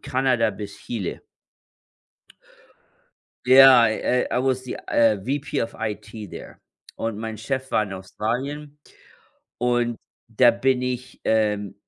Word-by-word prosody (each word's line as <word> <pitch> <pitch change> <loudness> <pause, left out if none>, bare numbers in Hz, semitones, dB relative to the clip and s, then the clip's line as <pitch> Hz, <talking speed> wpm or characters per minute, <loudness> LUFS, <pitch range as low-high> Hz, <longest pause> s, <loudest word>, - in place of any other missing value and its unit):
Kanada 125 -4 +1
bis 100 0 -8
Chile. 105 -7 -5 2.2
Ja, 130 -2 +8
äh, 125 +3 0
I - - +1
was 130 -1 0
the, 125 - -5
äh, 115 -3 +3
VP 140 +8 -3
of 115 - -5
IT 110 -1 -6
there - - -10 0.4
und 115 -2 -3
mein 110 0 -5
Chef 130 +2 -4
war - - +2
in 100 -2 -6
Australien 135 +10 -5 0.8
und 120 -1 0 0.3
da 120 +1 +4
bin 125 +2 0
ich 125 0 -5
ähm, 105 -3 0
120 Hz, 120 wpm, -23 LUFS, 110-130 Hz, 2.2 s, Ja